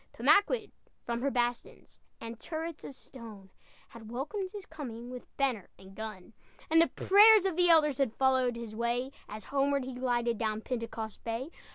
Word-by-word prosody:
Pemaquid, 420 +2 +3 0.3
from 235 0 -3
her 280 - +1
bastions 240 -2 -3 0.2
And 230 0 -8
turrets 325 0 -5
of 275 - -8
stone, 215 -9 -12 0.4
Had 225 -2 -12
welcomed 340 - -4
his 405 -1 -9
coming 245 -6 -8
With 250 -1 -11
banner 255 -8 -1
and 190 +1 -15
gun. 215 -1 -8 0.4
And 325 +1 +6
the 335 - +4
prayers 415 +1 +6
of 380 -4 0
the 355 0 +4
elders 300 -5 +4
Had 260 -5 0
followed 260 -2 +2
his 230 -2 -7
way, 240 +3 -1 0.2
As 215 +1 -7
homeward 280 -1 0
he 260 - -6
glided, 240 -2 -1
Down 220 -1 -1
Pentecost 230 -3 -5
Bay. 235 +7 -4
250 Hz, 170 wpm, -30 LUFS, 230-300 Hz, 0.4 s, And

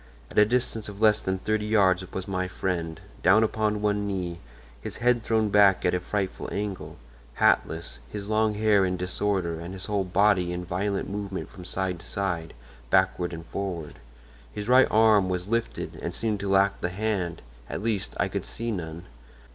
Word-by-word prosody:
At - - -11
a 105 - +8
distance 115 -2 -1
of 100 -1 -10
less 110 -1 +5
than 95 0 -1
thirty 105 +2 -1
yards 95 -4 +3
was 95 - -5
my 95 -1 -1
friend, 85 -3 -3 0.2
down 100 +5 +5
upon 105 -1 0
one 105 -1 +1
knee, 90 -3 -3 0.4
his - - -6
head 120 0 +2
thrown 110 -1 +1
back 100 -2 +5
at 90 - +3
a 90 - +1
frightful 95 +1 -3
angle, 100 -2 -4 0.4
hatless, 80 +1 +1
his 100 -1 -5
long 110 0 +2
hair 105 -2 +4
in 90 -1 0
disorder 90 -2 -1
and 85 +3 -7
his 95 - -6
whole 100 -2 0
body 95 -1 +3
in 90 0 -4
violent 95 +3 -1
movement 100 -1 -5
from 90 - -11
side 90 -1 -2
to - - -12
side, 85 -5 -3 0.3
backward 95 0 +2
and 80 -1 -7
forward. 85 -5 -5 0.5
His 105 0 -6
right 130 +1 +6
arm 110 -3 +5
was 90 0 -2
lifted 115 +1 -2
and - - -4
seemed 110 -3 -1
to 100 - -3
lack 95 +1 +3
the 90 - 0
hand—at 90 - -4
least, 110 -4 -1
I - - +2
could - - -4
see 115 +1 -3
none. 85 -4 -5
100 Hz, 180 wpm, -26 LUFS, 90-105 Hz, 0.5 s, a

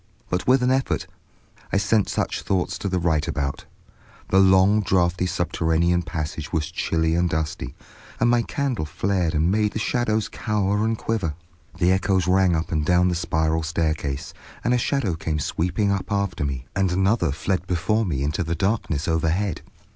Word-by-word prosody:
But 90 - -1
with 130 0 +4
an 125 - +3
effort 130 0 0 0.7
I - - +2
sent 100 +1 +2
such - - -1
thoughts 95 -2 -1
to 100 - -2
the 95 - 0
right 80 -4 +1
about. 70 -1 -3 0.6
The 95 - +4
long, 95 +2 +5
drafty 90 -2 +1
subterranean 85 -1 +1
passage 80 -2 -5
was 80 0 -1
chilly 80 -2 0
and 85 +1 +2
dusty, 80 -1 -3 0.4
and 120 - +3
my 120 0 +4
candle 130 - -2
flared 90 +1 -1
and 80 +4 +2
made 105 0 +1
the - - -3
shadows 110 -2 0
cower 105 -1 -1
and 110 0 0
quiver. 100 -11 -2 0.4
The 90 0 +3
echoes 95 -1 +2
rang 90 -1 +3
up 80 +1 -2
and 80 -2 +1
down 90 +2 +3
the - - 0
spiral 80 -1 0
staircase, 80 -4 -2 0.3
and 120 - +2
a 125 - +2
shadow 120 -7 0
came 80 -1 -2
sweeping 90 +7 0
up 100 +1 -2
after 100 -6 -1
me, 65 -3 -3
and 95 -2 +1
another 95 -2 +2
fled 90 +5 -2
before 95 +6 +1
me 75 -9 -2
into 75 +4 -1
the 85 +1 -2
darkness 85 -5 -1
overhead. 80 +3 0
90 Hz, 175 wpm, -23 LUFS, 80-100 Hz, 0.7 s, long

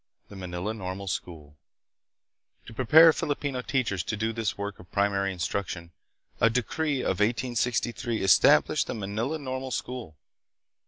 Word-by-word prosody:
The 100 - -11
Manila 90 +2 -4
Normal 95 -2 -6
School. 75 -6 -6 1.1
To - - -11
prepare 155 +7 +7
Filipino 145 -5 -2
teachers 120 -8 -1
to 105 - -3
do 110 +2 -1
this 110 -3 -2
work 100 0 -5
of 90 - -15
primary 100 -1 +1
instruction, 90 -1 -4 0.5
a 115 - +5
decree 135 +4 -1
of 95 - -1
1863 120 0 0
established 95 -3 +5
the - - -3
Manila 110 +8 -2
Normal 130 -2 -5
School. 120 -7 -5
110 Hz, 130 wpm, -27 LUFS, 95-125 Hz, 1.1 s, prepare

